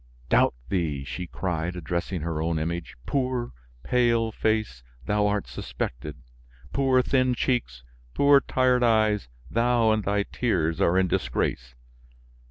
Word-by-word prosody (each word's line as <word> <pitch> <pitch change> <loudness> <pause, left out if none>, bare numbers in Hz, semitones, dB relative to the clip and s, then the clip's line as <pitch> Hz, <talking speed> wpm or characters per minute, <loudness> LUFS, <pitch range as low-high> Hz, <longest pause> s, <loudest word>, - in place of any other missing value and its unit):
"Doubt - - +4
thee!" 80 -8 -1
she 90 +6 -6
cried, 90 -1 -3
addressing 85 +1 -3
her 80 -1 -2
own 80 0 0
image; 85 +2 -4
"poor, 130 -3 -1 0.3
pale 115 - +2
face, 110 - -1 0.2
thou 105 +6 +2
art 105 -1 0
suspected! 65 +2 -6 0.5
poor 130 -2 +3
thin 130 -1 +2
cheeks, 115 - -1 0.3
poor 140 0 +6
tired 130 -2 +2
eyes, 110 - +2 0.2
thou 115 -1 +3
and 110 -1 +1
thy 100 +1 +1
tears 85 -10 -1
are 85 +2 +3
in 95 0 +3
disgrace. - - -2
100 Hz, 130 wpm, -26 LUFS, 80-120 Hz, 0.5 s, poor